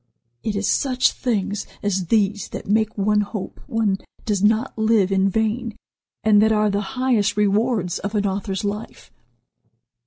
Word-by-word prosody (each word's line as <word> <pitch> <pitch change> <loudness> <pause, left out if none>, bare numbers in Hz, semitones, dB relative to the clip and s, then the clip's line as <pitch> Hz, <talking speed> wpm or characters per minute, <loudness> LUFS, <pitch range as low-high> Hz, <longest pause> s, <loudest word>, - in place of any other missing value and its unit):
It 215 - -2
is 205 0 -1
such 255 -2 +2
things 205 -4 -2 0.2
as 190 -3 -1
these 205 -1 +1
that - - -7
make 220 +1 +1
one 210 +1 +2
hope 205 -1 -6
one 220 -6 0 0.3
does 205 -3 0
not 220 +4 +2
live 220 -3 +2
in 195 0 +3
vain, 220 +2 -1 0.5
and 210 -1 +5
that 220 +1 +4
are 210 -1 +2
the 200 +1 0 0.2
highest 225 -5 +1
rewards 210 -2 +1
of 200 +2 -4
an 205 -1 +1
author's 195 0 -2
life." 205 +2 -5
210 Hz, 155 wpm, -22 LUFS, 200-220 Hz, 0.5 s, and